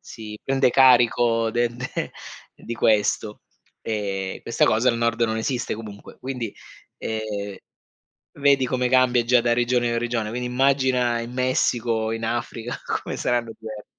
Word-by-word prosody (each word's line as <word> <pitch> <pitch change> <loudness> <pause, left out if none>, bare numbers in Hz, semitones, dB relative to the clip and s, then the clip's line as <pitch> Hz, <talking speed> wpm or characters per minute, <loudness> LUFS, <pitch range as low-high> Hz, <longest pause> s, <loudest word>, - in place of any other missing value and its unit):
si 105 -1 -9
prende 135 -1 +3
carico 120 -3 +4
de 120 +1 +1
de 130 +2 -4 0.4
di 120 - -7
questo, 105 -1 +1 0.4
e 100 -3 -3
questa 115 - +1
cosa 115 +4 +3
al 115 - -3
nord 115 0 0
non 110 -1 +1
esiste 125 +1 -2
comunque. 105 -2 -10
Quindi, 125 -5 -4 0.4
ehm, 105 -3 -4 0.8
vedi 140 -2 +3
come 125 -1 0
cambia 125 -2 +4
già 125 0 +4
da 120 0 +1
regione 120 0 +1
a - - 0
regione, 115 -2 -2
quindi 125 +2 -3
immagina 125 -2 +2
in 120 +1 -7
Messico, 120 -3 0
in 115 0 -4
Africa 120 0 -4 0.2
come - - -5
saranno 120 -2 -1
diversi. 110 -1 -8
120 Hz, 145 wpm, -23 LUFS, 110-125 Hz, 0.8 s, carico